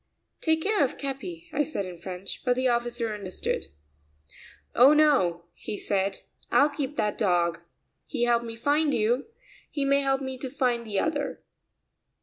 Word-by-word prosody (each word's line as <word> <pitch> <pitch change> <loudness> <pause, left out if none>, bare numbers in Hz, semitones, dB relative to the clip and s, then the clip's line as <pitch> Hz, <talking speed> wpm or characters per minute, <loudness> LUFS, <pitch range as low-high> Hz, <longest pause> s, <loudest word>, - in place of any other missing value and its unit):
"Take 320 -1 +2
care 415 -6 +3
of 265 - -1
Capi," 325 +5 -5
I 295 - +2
said 295 -9 -2
in 180 -2 -8
French, 185 +2 -6
but 250 -1 +2
the 255 +1 +1
officer 240 -2 0
understood. 200 -3 -3 1.1
"Oh, 260 +5 +7
no," 270 - +3
he 210 - -6
said; 195 -1 -1 0.3
"I'll 290 - +5
keep 285 -1 -4
that 210 -1 0
dog. 175 -4 +2 0.5
He 240 - -1
helped 235 -1 +3
me 230 -1 -6
to 230 - -18
find 295 0 +3
you; 235 +5 +1 0.4
he 285 -2 -2
may 280 0 +3
help 270 0 +1
me 265 -1 -4
to 265 - -4
find 245 -3 0
the 205 -2 -2
other." 290 -3 -2
250 Hz, 165 wpm, -27 LUFS, 210-285 Hz, 1.1 s, Oh